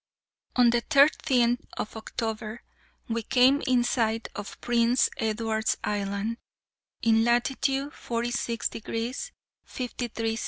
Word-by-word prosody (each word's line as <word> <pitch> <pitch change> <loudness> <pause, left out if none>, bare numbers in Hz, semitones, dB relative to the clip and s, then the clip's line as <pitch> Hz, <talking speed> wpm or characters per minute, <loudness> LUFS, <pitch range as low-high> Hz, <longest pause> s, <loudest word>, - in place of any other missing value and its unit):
On 245 -2 +6
the 240 0 +2
thirteenth 265 -4 +3
of 215 - -4
October 220 0 -4 0.4
we 230 0 -1
came 255 +5 +4
in 250 -1 +4
sight 225 -2 0
of 205 0 -7
Prince 240 +1 +2
Edward's 220 0 0
Island, 205 +2 -2 0.7
in 225 -1 +4
latitude 270 +4 +1
46 235 0 -2
degrees 230 +3 -4 0.3
53' 235 -3 -3
S. 225 - -4
235 Hz, 110 wpm, -27 LUFS, 225-245 Hz, 0.7 s, On